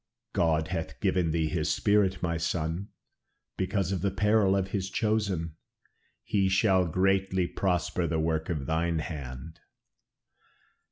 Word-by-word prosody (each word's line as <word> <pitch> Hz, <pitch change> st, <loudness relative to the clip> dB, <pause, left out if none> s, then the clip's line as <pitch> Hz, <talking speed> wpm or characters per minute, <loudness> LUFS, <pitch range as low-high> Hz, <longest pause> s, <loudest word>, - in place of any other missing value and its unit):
"God 80 Hz, -1 st, +1 dB
hath 80 Hz, -3 st, -4 dB
given 90 Hz, -3 st, +1 dB
thee 80 Hz, 0 st, +1 dB
this 80 Hz, -2 st, 0 dB
spirit, 100 Hz, -3 st, +2 dB
my 85 Hz, -1 st, 0 dB
son, 80 Hz, +3 st, -2 dB, 0.7 s
because 95 Hz, 0 st, -1 dB
of 95 Hz, -, -1 dB
the 100 Hz, -, +1 dB
peril 105 Hz, 0 st, +3 dB
of 95 Hz, -1 st, 0 dB
his 95 Hz, -1 st, -2 dB
chosen. 100 Hz, -8 st, -1 dB, 0.7 s
He 100 Hz, -2 st, +1 dB
shall 95 Hz, -2 st, +3 dB
greatly 95 Hz, +1 st, +1 dB
prosper 90 Hz, -1 st, -1 dB
the 80 Hz, -1 st, 0 dB
work 80 Hz, 0 st, -1 dB
of 75 Hz, -6 st, -2 dB
thine 80 Hz, +2 st, 0 dB
hand." 75 Hz, -1 st, -6 dB
90 Hz, 130 wpm, -28 LUFS, 80-95 Hz, 0.7 s, peril